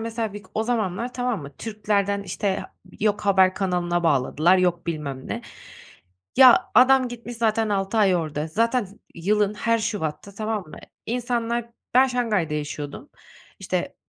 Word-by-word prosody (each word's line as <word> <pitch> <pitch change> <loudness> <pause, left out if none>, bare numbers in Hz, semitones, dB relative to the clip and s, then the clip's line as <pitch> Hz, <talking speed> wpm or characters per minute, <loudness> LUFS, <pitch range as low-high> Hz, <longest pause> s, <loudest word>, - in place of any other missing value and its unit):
mesela 225 -1 -3
vik 205 +1 -9
o 220 - +1
zamanlar, 230 0 -2
tamam 245 - -2
mı? 140 0 -11
Türk'lerden, 205 -2 -1
işte, 195 0 -2
ha - - -8 0.3
yok 210 0 +1
haber 190 -2 +4
kanalına 175 -3 -1
bağladılar, 160 +4 +3
yok 175 -2 0
bilmem 145 -5 -4
ne. - - -4 0.9
Ya, 255 -2 +7
adam 260 0 +6
gitmiş 240 0 -8
zaten 225 -1 +1
6 200 +2 -1
ay 195 -4 +4
orada, 155 -2 -3
zaten 230 +6 +1
z 195 +1 -14 0.2
yılın 205 +4 +1
her 230 +2 +1
şubatta, 200 -4 -4
tamam 215 0 -2
mı? - - -11 0.3
İnsanlar, 235 -1 -2 0.2
ben 260 +1 +7
Şanghay'da 215 -11 0
yaşıyordum, 145 -1 -5 0.5
işte, - - -3
205 Hz, 150 wpm, -24 LUFS, 175-230 Hz, 0.9 s, Ya